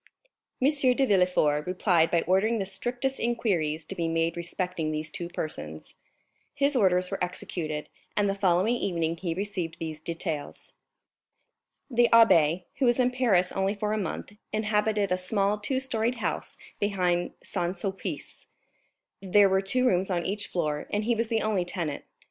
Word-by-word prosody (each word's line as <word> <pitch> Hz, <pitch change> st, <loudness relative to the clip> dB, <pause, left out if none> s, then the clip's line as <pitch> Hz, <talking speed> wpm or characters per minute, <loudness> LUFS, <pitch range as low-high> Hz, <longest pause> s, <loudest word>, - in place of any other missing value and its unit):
M. 260 Hz, -, +3 dB, 0.3 s
de 270 Hz, -, +3 dB
Villefort 180 Hz, -, +2 dB
replied 180 Hz, -3 st, +2 dB
by 170 Hz, -1 st, +2 dB
ordering 195 Hz, +6 st, +2 dB
the 195 Hz, -, -1 dB
strictest 245 Hz, +7 st, -2 dB
inquiries 170 Hz, -10 st, 0 dB
to -, -, -5 dB
be 170 Hz, -1 st, -2 dB
made 165 Hz, 0 st, 0 dB
respecting 175 Hz, -1 st, -3 dB
these 155 Hz, 0 st, -3 dB
two 170 Hz, +1 st, -5 dB
persons; 80 Hz, -, -5 dB, 0.6 s
his 280 Hz, +1 st, +2 dB
orders 185 Hz, -5 st, +3 dB
were -, -, -2 dB
executed, 160 Hz, -4 st, -3 dB, 0.3 s
and 205 Hz, -1 st, +3 dB
the 195 Hz, -, +1 dB
following 195 Hz, +2 st, +2 dB
evening 170 Hz, -6 st, -1 dB
he 165 Hz, -1 st, -3 dB
received 190 Hz, -4 st, -3 dB
these 155 Hz, -1 st, -6 dB
details: 165 Hz, -3 st, -5 dB, 1.2 s
"The 240 Hz, 0 st, +4 dB
abbé, 180 Hz, -7 st, +5 dB, 0.2 s
who 270 Hz, -, +3 dB
was 240 Hz, +1 st, +3 dB
in 250 Hz, 0 st, +3 dB
Paris 215 Hz, -8 st, +2 dB
only 195 Hz, +2 st, 0 dB
for 210 Hz, +1 st, -1 dB
a -, -, 0 dB
month, 195 Hz, +2 st, -4 dB, 0.2 s
inhabited 210 Hz, -2 st, 0 dB
a 180 Hz, -, +2 dB
small 200 Hz, +2 st, +1 dB
two 260 Hz, +5 st, -1 dB
storied 240 Hz, -2 st, 0 dB
house 235 Hz, -, -3 dB, 0.2 s
behind 180 Hz, -4 st, 0 dB
Saint 180 Hz, -1 st, -2 dB
Sulpice; 190 Hz, +2 st, -5 dB, 0.7 s
there 200 Hz, +1 st, +5 dB
were 190 Hz, 0 st, +3 dB
two 250 Hz, +6 st, +1 dB
rooms 190 Hz, -4 st, +2 dB
on 175 Hz, -2 st, -1 dB
each 205 Hz, +1 st, -2 dB
floor 150 Hz, -4 st, -2 dB
and 205 Hz, +1 st, 0 dB
he 235 Hz, +2 st, +2 dB
was 230 Hz, 0 st, -1 dB
the 225 Hz, -1 st, 0 dB
only 210 Hz, -4 st, +1 dB
tenant. 170 Hz, -5 st, -4 dB
190 Hz, 160 wpm, -27 LUFS, 170-215 Hz, 1.2 s, abbé